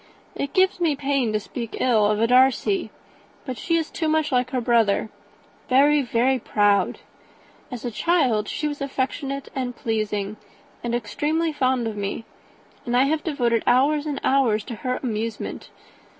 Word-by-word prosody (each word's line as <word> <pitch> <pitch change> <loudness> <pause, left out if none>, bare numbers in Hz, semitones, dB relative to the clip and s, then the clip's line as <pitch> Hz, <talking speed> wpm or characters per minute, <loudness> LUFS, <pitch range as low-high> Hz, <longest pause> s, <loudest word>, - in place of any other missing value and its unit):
It 280 - -4
gives 375 -1 +3
me 325 -4 +2
pain 275 -4 0
to 215 - 0
speak 230 +2 -6
ill 220 -5 +3
of 210 0 +1
a 225 - +3
Darcy; 265 - +3 0.6
but 260 -2 -4
she 335 +9 -1
is 325 -1 -1
too 320 - -2
much 310 -1 +1
like 250 -1 +1
her 255 -1 -1
brother, 225 -3 +2 0.6
very, 285 +3 +5
very 255 +1 +1
proud. 205 -4 +1 0.7
As 250 -1 -7
a 240 - -2
child, 250 -7 +1
she 300 - -2
was 290 -1 -5
affectionate 275 0 -3
and 250 -2 -3
pleasing, 215 -2 -2 0.5
and 235 0 -1
extremely 300 +9 -1
fond 255 -3 +1
of 220 - -4
me; 205 +2 -4 0.6
and 245 -2 0
I 255 - +5
have 305 +3 0
devoted 240 -8 +1
hours 290 +4 +3
and 290 -2 -3
hours 240 -6 +2
to 235 - -7
her 255 +1 -2
amusement. 225 -2 -4
255 Hz, 165 wpm, -23 LUFS, 225-285 Hz, 0.7 s, very